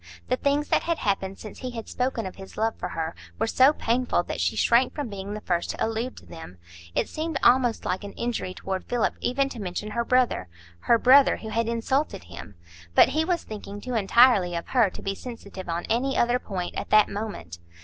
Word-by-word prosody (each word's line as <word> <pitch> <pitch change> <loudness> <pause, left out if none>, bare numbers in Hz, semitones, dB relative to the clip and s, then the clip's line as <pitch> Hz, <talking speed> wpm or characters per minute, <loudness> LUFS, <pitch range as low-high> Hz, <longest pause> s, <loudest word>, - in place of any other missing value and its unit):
The 255 - +3
things 285 +3 0
that - - +3
had 335 -1 -1
happened 195 -2 -1
since 215 - -10
he 255 - -4
had 230 -2 -7
spoken 250 -3 -2
of 185 - -7
his 195 -1 -11
love 225 +1 0
for - - -5
her 165 0 -3 0.2
were 225 - +1
so 260 +5 +5
painful 250 -3 0
that - - -4
she - - +1
shrank 240 +2 +3
from 290 -5 -3
being 200 0 -6
the 210 - -6
first 175 -3 -1
to - - -1
allude 225 +3 -3
to - - -13
them. 160 - -11 0.4
It - - +1
seemed 315 -1 -3
almost 245 -2 +4
like 190 - -2
an 200 - -7
injury 235 -6 -3
toward 190 -1 -4
Philip 245 -2 0
even 270 +2 +1
to 240 - -8
mention 200 +3 -4
her 235 +2 0
brother,—her 90 - 0
brother, 265 +4 +6
who 220 - -8
had 230 +1 0
insulted 235 - -1
him. 85 +2 -11 0.4
But - - +7
he 315 +1 +1
was 345 0 -1
thinking 205 -1 -8
too 250 +4 -6
entirely 210 -4 +4
of 170 - -5
her 240 -6 +4
to - - -10
be 195 - -1
sensitive 200 -5 -9
on 170 +1 -2
any 265 +4 0
other 240 +1 +2
point 185 -7 -4
at - - -5
that 215 -1 +6
moment. 140 - -6
225 Hz, 215 wpm, -26 LUFS, 190-255 Hz, 0.4 s, But